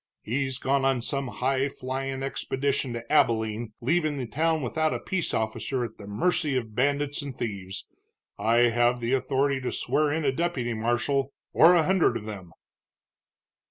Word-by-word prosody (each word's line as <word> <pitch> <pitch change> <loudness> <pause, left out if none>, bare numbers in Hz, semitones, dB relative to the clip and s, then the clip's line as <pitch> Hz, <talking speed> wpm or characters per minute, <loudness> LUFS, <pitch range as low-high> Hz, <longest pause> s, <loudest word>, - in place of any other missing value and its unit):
He's 130 +2 -1
gone 135 +1 +1
on 135 -3 +1
some 140 +1 -1
high 135 +2 0
flyin' 135 +1 -4
expedition 135 -1 -1
to 115 +2 -7
Abilene, 110 -5 +2
leaving 155 +3 +1
the 130 - -3
town 155 +6 0
without 155 +5 0
a - - -3
peace 185 -4 -2
officer 115 +3 -1
at 110 - -10
the 100 - -9
mercy 140 - +1
of 110 -4 -4
bandits 140 +4 +1
and 140 -3 -6
thieves. 100 -6 -5 0.5
I 120 +1 +4
have 120 +1 +3
the 120 +2 -1
authority 135 +1 +1
to 125 - -2
swear 150 -1 +1
in 160 0 -1
a 135 - +3
deputy 130 -6 -1
marshal, 120 +5 0 0.2
or 170 +3 +7
a 170 - +4
hundred 185 +1 +3
of 105 - -9
them." 95 -5 -8
130 Hz, 165 wpm, -27 LUFS, 120-145 Hz, 0.5 s, or